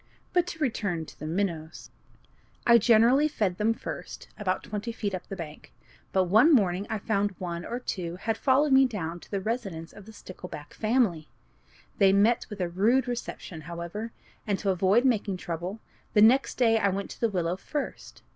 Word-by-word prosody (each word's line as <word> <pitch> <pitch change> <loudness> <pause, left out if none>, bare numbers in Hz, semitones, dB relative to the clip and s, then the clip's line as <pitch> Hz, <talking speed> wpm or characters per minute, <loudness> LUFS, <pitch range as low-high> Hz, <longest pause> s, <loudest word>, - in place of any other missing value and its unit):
But 355 -1 +3
to 350 - -6
return 205 - -1
to - - -15
the 155 - -5
minnows. 165 -2 -3 0.7
I 235 -1 +7
generally 235 +6 +5
fed 200 -11 -1
them 225 +2 +2
first, - - -7
about 185 -3 -2
twenty 215 +2 -4
feet 210 -3 -3
up 185 - -5
the 195 - -5
bank; 155 -4 -9 0.4
but 190 - +3
one 220 - +5
morning 195 -3 +1
I 220 - -1
found 205 -1 -1
one 175 -2 -4
or 240 - -4
two 175 -8 -4
had 220 +4 -2
followed 275 +4 +3
me 265 0 +6
down 175 -7 -4
to - - -16
the 200 - -1
residence 195 -6 -4
of 205 0 -13
the - - -10
stickleback 180 -7 -10
family. 215 -9 +1 0.7
They 195 -2 +6
met 215 +4 +3
with 205 -3 -6
a 180 - +1
rude 225 +9 +2
reception, 230 -8 -5
however, 170 +7 -6 0.4
and, 200 -2 +1
to 195 -1 0
avoid 190 +7 +3
making 210 -6 +1
trouble, 175 +4 -5 0.3
the 210 - +5
next 255 +5 +4
day 225 -3 +3
I 200 - +2
went 195 +1 -3
to - - -11
the 230 - +3
willow 175 -3 -1
first. 290 +9 -6
205 Hz, 185 wpm, -27 LUFS, 180-230 Hz, 0.7 s, I